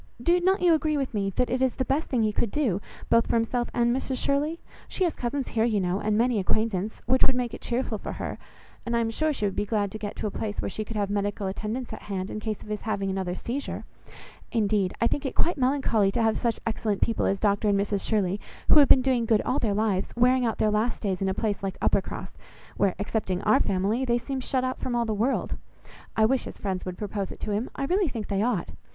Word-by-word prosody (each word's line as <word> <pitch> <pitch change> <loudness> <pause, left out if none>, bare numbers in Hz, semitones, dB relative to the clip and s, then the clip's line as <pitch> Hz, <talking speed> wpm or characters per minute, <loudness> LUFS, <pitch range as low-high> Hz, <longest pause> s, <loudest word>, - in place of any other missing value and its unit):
Do 345 +9 +3
not 375 +2 +2
you 345 -2 +6
agree 310 -1 +1
with 270 -3 -2
me, 200 -2 0
that 250 - +1
it 255 +1 0
is 260 -2 +2
the 260 - -1
best 290 +5 0
thing 240 -4 +2
he 215 -1 +1
could 230 - 0
do, 215 -8 0 0.3
both 230 0 +5
for - - +1
himself 235 +1 0
and 240 0 +2
Mrs 265 0 -2
Shirley? 295 +5 0 0.3
She 380 - -1
has 340 -3 +2
cousins 260 +2 -3
here, 225 - +1
you 225 -3 +2
know, 185 +1 0
and 210 0 +1
many 235 -1 +2
acquaintance, 215 +1 -1
which 260 +2 +3
would 265 - +2
make 245 -2 -1
it - - -7
cheerful 235 -3 -1
for - - -5
her, - - -5 0.4
and 235 0 0
I - - +3
am 225 -1 0
sure 310 +7 +1
she 240 -8 -1
would 195 -2 -1
be - - 0
glad 205 -2 0
to 215 - -6
get 205 -1 -5
to - - -4
a 210 - -1
place 210 0 -4
where - - -2
she 215 - -3
could 220 +1 -8
have 200 -1 0
medical 205 0 -1
attendance 215 +6 -3
at - - -7
hand, 190 -1 -4
in - - -4
case 215 -1 -4
of - - -13
his 210 0 -3
having 205 -3 -1
another 190 -2 -2
seizure. 260 +8 -4 0.7
Indeed 205 -4 +1
I - - +2
think 275 - 0
it 270 - -3
quite 345 - +2
melancholy 250 -6 +2
to 235 - +1
have 220 -1 +3
such 235 -2 0
excellent 220 -3 -1
people 230 - +1
as 195 - 0
Dr 205 +1 +2
and 200 -1 +3
Mrs 200 0 -1
Shirley, 200 -3 +1 0.3
who - - +8
have 280 - +6
been 260 - +7
doing 250 -3 +1
good 220 -2 +3
all 270 - 0
their 210 -4 0
lives, 205 -3 0
wearing 250 +2 +4
out 225 - -1
their 215 - +2
last 220 +3 0
days 190 -3 -1
in 195 - +1
a 190 - -1
place 210 -3 -1
like 195 -1 -3
Uppercross, - - 0 0.4
where, 195 -2 +2
excepting 200 -3 -2
our 220 +6 +5
family, 200 +3 +1
they 240 -2 +2
seem 270 +2 -4
shut 255 0 0
out 255 0 -2
from 245 - -2
all 235 0 +1
the 220 - -1
world. 230 +6 0 0.6
I 220 - +5
wish 260 +3 +1
his - - -8
friends 190 -2 -3
would 180 -1 -5
propose 205 -2 -3
it - - -10
to 210 - -2
him. 215 +5 -1
I 275 - -2
really 370 +4 +2
think 225 -4 -5
they 200 -1 +1
ought. 220 -6 0
225 Hz, 260 wpm, -27 LUFS, 205-255 Hz, 0.7 s, who